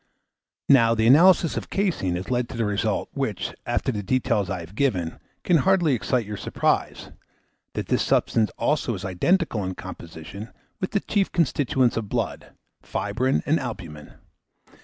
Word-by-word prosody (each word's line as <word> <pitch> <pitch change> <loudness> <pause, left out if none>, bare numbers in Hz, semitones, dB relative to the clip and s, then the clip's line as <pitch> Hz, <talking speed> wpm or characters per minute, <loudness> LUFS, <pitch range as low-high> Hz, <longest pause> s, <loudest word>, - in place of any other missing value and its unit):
Now, 115 -4 +5
the 110 0 +1
analysis 165 +6 +6
of - - -5
caseine 175 - 0
has 90 +7 -5
led 125 -1 0
to 120 - -7
the 115 - 0
result, 105 +1 -1
which, 110 -10 -3
after 120 +2 0
the 105 -4 -3
details 105 -4 0
I 90 -1 -3
have 85 +3 -11
given, 100 -10 -1 0.2
can 175 - +4
hardly 175 -2 +3
excite 125 0 0
your 105 0 -6
surprise, - - -1 0.6
that - - -2
this - - +1
substance 110 -2 +2
also 145 -6 0
is 95 0 -7
identical 110 - +1
in 95 0 -4
composition 90 +4 -9 0.3
with 185 - -2
the 200 - +1
chief 200 -2 0
constituents 135 -6 +1
of 110 -3 -3
blood, - - -3 0.3
fibrine 125 +6 -1
and 155 +3 +2
albumen. 85 - -7
115 Hz, 160 wpm, -24 LUFS, 100-140 Hz, 0.6 s, analysis